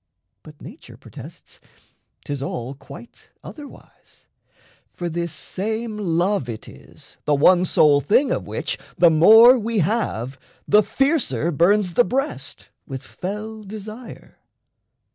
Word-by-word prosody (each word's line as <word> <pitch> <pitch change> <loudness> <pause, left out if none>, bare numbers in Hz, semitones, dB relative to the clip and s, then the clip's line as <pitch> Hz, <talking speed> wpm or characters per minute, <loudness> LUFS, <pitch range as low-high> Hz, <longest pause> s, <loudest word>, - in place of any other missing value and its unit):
But 150 -1 -16
nature 215 - -13
protests - - -13 0.7
'tis 145 -2 -5
all 130 -2 -5
quite 140 - -14
otherwise; 290 -2 -14 0.7
For 175 -1 -4
this 170 0 -3
same 220 +7 -4
love 180 -6 -1
it 110 -2 -7
is - - -15
the 150 - +2
one 180 +5 +4
sole 145 -4 +4
thing 235 - +2
Of - - -3
which, - - -4 0.2
the 170 -2 +5
more 225 +10 +7
we 230 +1 -3
have, 145 - -2 0.3
the 210 +1 +5
fiercer 250 - 0
burns 180 +4 +2
The 245 - +4
breast 270 +5 -4 0.2
with 135 -2 -7
fell 210 +8 -7
desire. 215 +4 -11
185 Hz, 125 wpm, -21 LUFS, 150-220 Hz, 0.7 s, more